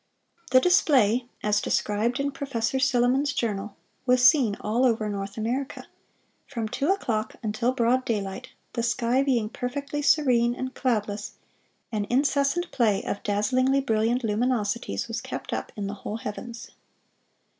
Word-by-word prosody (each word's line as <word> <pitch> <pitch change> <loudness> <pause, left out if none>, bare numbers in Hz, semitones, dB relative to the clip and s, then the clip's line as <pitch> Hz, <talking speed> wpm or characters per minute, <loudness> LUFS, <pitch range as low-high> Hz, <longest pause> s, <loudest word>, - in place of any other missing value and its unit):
The 255 - +6
display, 255 - +3 0.2
as 210 0 +2
described 220 +5 0
in 280 +1 0
Professor 265 -2 -2
Silliman's 260 +2 +2
Journal, 210 -5 -2 0.3
was 250 0 +4
seen 250 -10 +5
all 230 +4 0
over 225 -4 +2
North 200 0 -5
America.... 245 +5 -3 0.6
From 230 -5 -3
two 275 +8 -1
o'clock 225 - -1
until 220 +3 0
broad 255 0 +2
daylight, 210 +1 -3 0.2
the 235 - -1
sky 235 +2 +1
being 250 -6 +1
perfectly 280 +6 -4
serene 245 -5 +3
and 260 0 -5
cloudless, 210 -4 -1 0.6
an 210 -2 -2
incessant 280 +6 +1
play 215 -6 +2
of 200 - -3
dazzlingly 255 +7 +2
brilliant 235 0 +1
luminosities 225 0 -1
was - - -4
kept - - -6
up - - -4
in 205 -3 -4
the 200 - -3
whole 215 - -4
heavens." 230 +3 -7
240 Hz, 140 wpm, -26 LUFS, 215-265 Hz, 0.6 s, The